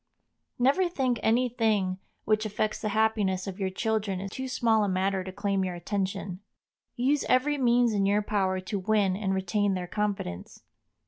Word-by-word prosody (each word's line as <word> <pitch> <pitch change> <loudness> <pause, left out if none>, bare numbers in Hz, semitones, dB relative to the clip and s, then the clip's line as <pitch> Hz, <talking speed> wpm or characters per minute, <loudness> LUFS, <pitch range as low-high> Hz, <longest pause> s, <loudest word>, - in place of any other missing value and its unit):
Never 280 +9 +3
think 260 -7 0
any 240 +3 +3
thing 215 -6 0 0.3
which 215 0 +2
affects 215 0 -2
the 215 - -1
happiness 210 -3 +1
of 195 0 -6
your 190 -1 0
children 200 -1 -2
too 260 +6 -5
small 230 -4 +2
a 205 - 0
matter 190 0 0
to 185 - -6
claim 200 0 -1
your 180 -1 -3
attention. 190 0 -3 0.6
Use 270 +4 +1
every 285 +3 +2
means 240 -2 +3
in 200 -1 +2
your 205 +1 +2
power 190 -3 0
to 195 +2 -3
win 200 -1 +2
and 195 -1 -1
retain 195 +1 0
their 180 -1 -3
confidence. 195 - -4
205 Hz, 170 wpm, -28 LUFS, 190-225 Hz, 0.6 s, Never